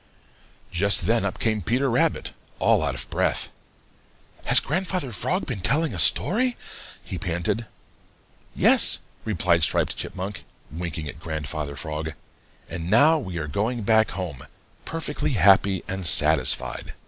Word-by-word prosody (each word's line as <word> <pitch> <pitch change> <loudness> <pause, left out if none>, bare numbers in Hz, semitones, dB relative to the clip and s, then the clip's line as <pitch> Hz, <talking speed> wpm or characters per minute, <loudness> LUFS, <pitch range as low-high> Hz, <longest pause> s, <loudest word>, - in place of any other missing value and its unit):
Just 100 +3 +1
then 115 -1 +1
up 100 - -3
came 110 -2 -1
Peter 125 +9 0
Rabbit, 125 -1 0 0.2
all - - +2
out - - -2
of 65 0 -7
breath. - - 0 0.9
"Has - - +6
Grandfather 180 -3 -3
Frog 100 - -1
been - - -5
telling 150 - +1
a - - -4
story?" 245 +5 +4 0.5
he 90 - -6
panted. 90 +5 -3 0.9
"Yes," - - +6 0.3
replied 85 -5 +1
Striped 75 - +1
Chipmunk, 95 0 -6 0.3
winking 80 -2 -6
at 80 - -9
Grandfather 75 -2 -5
Frog, 80 +1 -5 0.5
"and 85 0 -6
now 150 +10 +4
we 95 -10 -7
are 80 -2 -4
going 110 +9 -2
back 110 +1 +3
home 90 -9 -7 0.4
perfectly 150 -2 -3
happy 95 -1 +3
and 95 0 -5
satisfied." 85 -1 +3
95 Hz, 135 wpm, -23 LUFS, 85-120 Hz, 0.9 s, Has